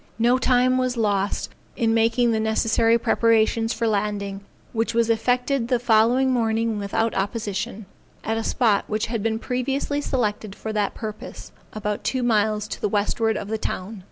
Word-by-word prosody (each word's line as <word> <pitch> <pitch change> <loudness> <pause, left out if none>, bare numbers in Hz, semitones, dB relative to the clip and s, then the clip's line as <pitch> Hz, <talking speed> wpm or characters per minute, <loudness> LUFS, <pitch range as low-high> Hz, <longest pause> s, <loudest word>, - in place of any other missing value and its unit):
No 240 +3 +3
time 255 0 +3
was 255 -1 -1
lost 205 -3 0 0.3
in 225 -1 +1
making 230 +1 +3
the 220 - +1
necessary 225 +1 +2
preparations 225 0 +2
for 235 - -2
landing, 200 -2 -1 0.3
which 230 0 -1
was 230 0 +3
effected 245 +2 0
the 250 0 +2
following 240 +3 +3
morning 225 -2 0
without 205 +3 -1
opposition, 210 +1 -3 0.4
at 225 - -1
a 225 - -2
spot 220 -5 +2
which 215 +1 -1
had 230 -1 -3
been 220 +1 0
previously 270 +4 -2
selected 215 -7 -2
for 220 - -5
that 210 -2 -1
purpose, 215 -2 -8 0.2
about 210 -1 -3
two 260 -2 -1
miles 215 -2 +1
to - - -6
the 210 - 0
westward 215 +2 0
of 200 - -5
the 220 +1 -3
town. 205 +1 -4
225 Hz, 165 wpm, -23 LUFS, 210-240 Hz, 0.4 s, No